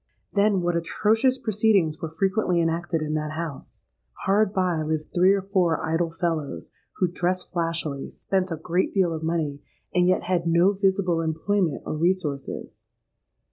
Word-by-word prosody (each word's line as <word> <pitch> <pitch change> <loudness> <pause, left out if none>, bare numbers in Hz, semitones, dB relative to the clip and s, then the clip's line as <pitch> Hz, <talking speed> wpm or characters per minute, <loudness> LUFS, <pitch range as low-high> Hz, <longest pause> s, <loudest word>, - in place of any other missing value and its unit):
Then, 200 -2 +3
what 175 0 +1
atrocious 220 +9 +2
proceedings 210 -9 +1
were 165 - -3
frequently 185 +2 +1
enacted 165 0 0
in 155 0 -2
that 155 0 -2
house! 160 -3 -7 0.4
Hard 200 +1 +3
by 185 -5 0
lived 155 0 -3
three 180 +2 +5
or 200 -1 +1
four 185 -4 +1
idle 165 +1 0
fellows, 165 -3 -3 0.2
who 185 - +1
dressed 180 +1 -2
flashily, 165 -5 -2
spent 190 -1 -1
a 165 - -3
great 175 +4 0
deal 185 -4 +2
of 160 - -4
money, 160 -3 -2 0.3
and 180 0 +3
yet 185 - +2
had 175 -2 0
no 170 +3 +4
visible 190 -3 +1
employment 165 +1 0
or - - -3
resources. 160 -4 -2
175 Hz, 155 wpm, -25 LUFS, 160-190 Hz, 0.4 s, three